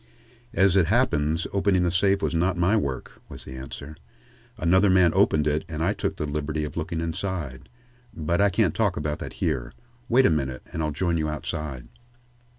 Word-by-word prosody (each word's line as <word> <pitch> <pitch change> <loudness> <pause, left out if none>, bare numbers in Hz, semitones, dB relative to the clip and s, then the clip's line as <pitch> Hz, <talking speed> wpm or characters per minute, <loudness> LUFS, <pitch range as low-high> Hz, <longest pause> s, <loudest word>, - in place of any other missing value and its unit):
"As 95 -3 +4
it 90 -5 +4
happens 80 - +1
opening 95 -2 +2
the 85 - +1
safe 95 +2 +2
was 80 0 0
not 90 +2 +1
my 90 +5 +3
work," 70 -11 -3
was - - -10
the 65 - -8
answer. 70 +3 -8 0.6
"Another 95 +5 +4
man 90 -2 +5
opened 80 -5 +3
it 75 +1 +1
and 80 -1 -3
I 95 +4 +2
took - - -2
the 75 - -3
liberty 75 +1 -2
of 75 - -5
looking 85 0 -3
inside. 80 -5 -4 0.4
But 85 +3 -1
I 100 - +5
can't 95 -3 +2
talk 105 -5 0
about 75 0 -2
that - - -6
here. - - -2 0.4
Wait 130 +3 +5
a - - +5
minute 65 -4 -2
and 80 - -2
I'll 75 - 0
join 85 +3 0
you 75 -1 -1
outside." 75 -4 -5
80 Hz, 190 wpm, -25 LUFS, 75-95 Hz, 0.6 s, man